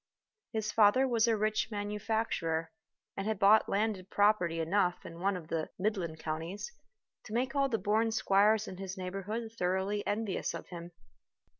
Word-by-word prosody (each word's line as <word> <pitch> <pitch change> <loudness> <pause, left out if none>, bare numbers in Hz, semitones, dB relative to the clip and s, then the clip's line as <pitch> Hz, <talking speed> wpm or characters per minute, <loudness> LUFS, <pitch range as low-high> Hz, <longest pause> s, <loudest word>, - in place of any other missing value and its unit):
His 220 -2 -2
father 225 +5 +5
was 235 -2 +2
a 225 -1 +3
rich 215 +1 0
manufacturer, 205 -6 -2 0.4
and 195 +1 -3
had 220 -1 0
bought 205 +3 +5
landed 200 -2 -1
property 205 -5 +2
enough 180 +2 +1
in 165 0 -9
one 195 +1 +1
of 165 -2 -10
the 160 -1 -2
midland 185 -5 -1
counties 165 - -4 0.5
to 215 - -8
make 255 +3 0
all 275 -1 +2
the 225 - +1
born 220 +2 +1
squires 215 0 +3
in 185 - -7
his 190 0 -6
neighborhood 195 +5 -4
thoroughly 190 0 -1
envious 210 -1 -1
of - - -8
him. 175 -1 -8
205 Hz, 160 wpm, -32 LUFS, 180-220 Hz, 0.5 s, father